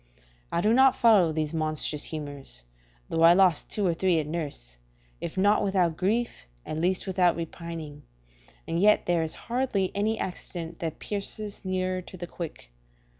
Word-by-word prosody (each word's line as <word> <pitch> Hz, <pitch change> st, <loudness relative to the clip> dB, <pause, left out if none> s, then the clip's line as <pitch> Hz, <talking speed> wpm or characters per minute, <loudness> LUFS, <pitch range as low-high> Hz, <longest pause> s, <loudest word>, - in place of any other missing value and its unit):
I 170 Hz, -, +1 dB
do 215 Hz, +4 st, +3 dB
not 265 Hz, +1 st, +6 dB
follow 215 Hz, -10 st, +5 dB
these 155 Hz, 0 st, -2 dB
monstrous 155 Hz, -2 st, 0 dB
humours, 145 Hz, -, -7 dB, 0.5 s
though 165 Hz, -, 0 dB
I 165 Hz, +1 st, +8 dB
lost 185 Hz, -3 st, +3 dB
two 205 Hz, -, -1 dB
or 175 Hz, -, +2 dB
three 180 Hz, 0 st, +2 dB
at 155 Hz, -, -2 dB
nurse, 145 Hz, -, -5 dB, 0.4 s
if 170 Hz, +2 st, -6 dB
not 205 Hz, +2 st, +4 dB
without 185 Hz, -5 st, +1 dB
grief, 215 Hz, -, -1 dB, 0.2 s
at 155 Hz, -, -4 dB
least 180 Hz, +3 st, 0 dB
without 185 Hz, -2 st, +2 dB
repining, 165 Hz, -3 st, -7 dB, 0.7 s
and 165 Hz, -, -1 dB
yet 210 Hz, +3 st, +4 dB
there 175 Hz, -2 st, +2 dB
is 160 Hz, -1 st, -3 dB
hardly 235 Hz, -6 st, -1 dB
any 215 Hz, +2 st, 0 dB
accident 170 Hz, -2 st, -6 dB
that 165 Hz, -2 st, -4 dB
pierces 205 Hz, 0 st, -5 dB
nearer 185 Hz, -1 st, -1 dB
to 185 Hz, -, -12 dB
the 175 Hz, -, -5 dB
quick. 165 Hz, -, -8 dB
175 Hz, 165 wpm, -27 LUFS, 160-195 Hz, 0.7 s, I